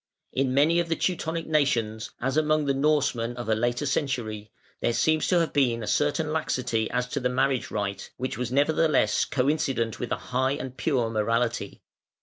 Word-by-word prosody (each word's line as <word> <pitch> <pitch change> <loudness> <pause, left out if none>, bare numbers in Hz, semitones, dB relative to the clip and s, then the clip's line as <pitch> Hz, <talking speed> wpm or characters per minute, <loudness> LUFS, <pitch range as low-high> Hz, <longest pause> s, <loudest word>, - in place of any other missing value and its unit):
In 130 -1 +1
many 160 +5 +4
of 170 -1 -1
the 165 - +1
Teutonic 165 -2 -2
nations, 120 -8 0
as 130 +2 -1
among 155 -1 +2
the 140 - +2
Norsemen 135 -5 +1
of 120 - -5
a - - +4
later 120 +5 0
century, 120 -7 -2 0.3
there 120 - 0
seems 155 +5 +2
to 180 - +3
have 165 - -2
been 120 -5 +2
a - - -5
certain 150 +1 +1
laxity 120 -7 -1
as 125 0 -1
to 140 - -2
the 125 -1 0
marriage 130 0 0
rite, 100 -2 -3
which 130 0 -3
was 125 +1 -3
nevertheless 145 -4 +2
coincident 135 -4 0
with 120 - -4
a - - +2 0.2
high 130 +2 +2
and 130 -3 -6
pure 125 -8 0
morality. 115 0 -1
130 Hz, 180 wpm, -26 LUFS, 115-150 Hz, 0.3 s, many